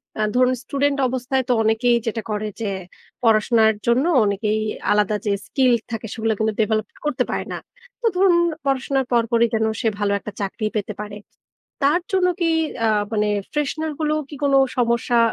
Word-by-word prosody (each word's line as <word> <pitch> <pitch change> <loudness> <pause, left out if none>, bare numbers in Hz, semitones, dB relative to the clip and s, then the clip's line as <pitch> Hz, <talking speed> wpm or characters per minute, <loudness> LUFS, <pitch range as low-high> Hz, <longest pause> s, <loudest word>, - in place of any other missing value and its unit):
অ্যা 215 - -1
ধরুন 255 0 +4
স্টুডেন্ট 280 +2 0
অবস্থায় 260 +1 -1
তো - - +5
অনেকেই 225 +2 +3
যেটা 225 0 -1
করে 215 0 -2
যে 210 - -1 0.5
পড়াশোনার 220 0 +4
জন্য 250 +6 +3 0.2
অনেকেই 210 +2 0 0.3
আলাদা 210 0 +2
যে 205 - +1 0.2
স্কিল 260 -2 +2 0.2
থাকে 225 0 -4
সেগুলো 225 -1 0
কিন্তু 220 0 +1
ডেভেলপ 215 0 0 0.2
করতে 300 - +1
পারে - - -2
না। - - -3 0.4
তো 475 - -4
ধরুন 365 -1 +4 0.3
পড়াশোনার 270 -1 0
পরপরই 235 0 +3
যেন 220 0 +2 0.2
সে 225 - 0
ভালো 205 -1 +1
একটা 210 - -7
চাকরি 200 +2 -3
পেতে 210 0 -2
পারে। 210 -1 -7 0.7
তার 305 +6 +3
জন্য 375 -1 +3
কি 330 - +3 0.4
আ - - +3 0.3
মানে 210 -1 +1 0.2
fresher 310 +2 -1
গুলো 305 -1 +1
কি 295 - -8
কোন 280 - +2 0.2
সমস্যা 235 0 +1
235 Hz, 170 wpm, -21 LUFS, 215-270 Hz, 0.7 s, তো